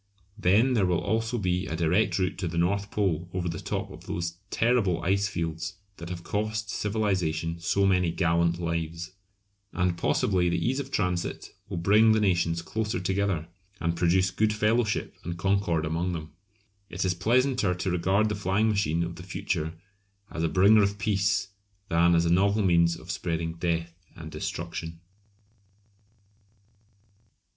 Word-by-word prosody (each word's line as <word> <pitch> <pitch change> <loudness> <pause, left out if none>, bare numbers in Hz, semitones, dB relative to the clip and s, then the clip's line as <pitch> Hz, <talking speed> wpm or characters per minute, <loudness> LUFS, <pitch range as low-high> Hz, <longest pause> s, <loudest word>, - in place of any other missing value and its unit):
Then 110 +6 +3
there 100 -6 +2
will 90 -1 +2
also 115 +3 -1
be 90 -3 -1
a 80 - -3
direct 90 +4 +2
route 95 0 -1
to 90 - -2
the 85 0 -4
North 100 +4 +1
Pole 90 -5 -1
over 90 -1 -1
the 85 -2 -3
top - - -4
of - - -12
those 85 0 -3
terrible 110 -8 +2
icefields 85 -4 -1 0.2
that 85 0 -8
have 85 -1 -6
cost 105 +1 -2
civilisation 90 -6 -1
so 100 +3 +1
many 90 -3 +3
gallant 85 0 +1
lives. 85 +1 -3 0.6
And 90 -1 +1
possibly 90 0 +2
the 85 - 0
ease 130 +3 0
of 135 -1 -5
transit 90 -7 -2 0.2
will - - -4
bring 105 +6 +5
the 110 - +3
nations 85 -4 +1
closer 110 0 -2
together, 95 -3 -1 0.3
and 85 0 -1
produce 90 +2 +2
good 105 +3 +1
fellowship 110 +1 +1
and 85 +1 -5
concord 95 -4 +1
among 85 +3 -1
them. 80 -2 -6 0.6
It 95 +2 -2
is 90 - +2
pleasanter 120 0 +2
to 90 +1 -2
regard 95 +5 +2
the - - -1
flying 100 +2 +1
machine 85 -6 +1
of 85 0 -5
the - - -8
future 90 -3 -3 0.6
as 80 - -4
a 80 - +2
bringer 100 +3 +5
of 100 0 +1
peace 100 -1 +1 0.4
than 85 +1 +4
as 85 0 +3
a 85 - +3
novel 100 +3 +3
means 85 -2 +3
of 85 +3 -8
spreading 85 -4 -2
death 85 0 -2 0.2
and - - -9
destruction. 80 0 -5
90 Hz, 160 wpm, -27 LUFS, 85-100 Hz, 0.6 s, bring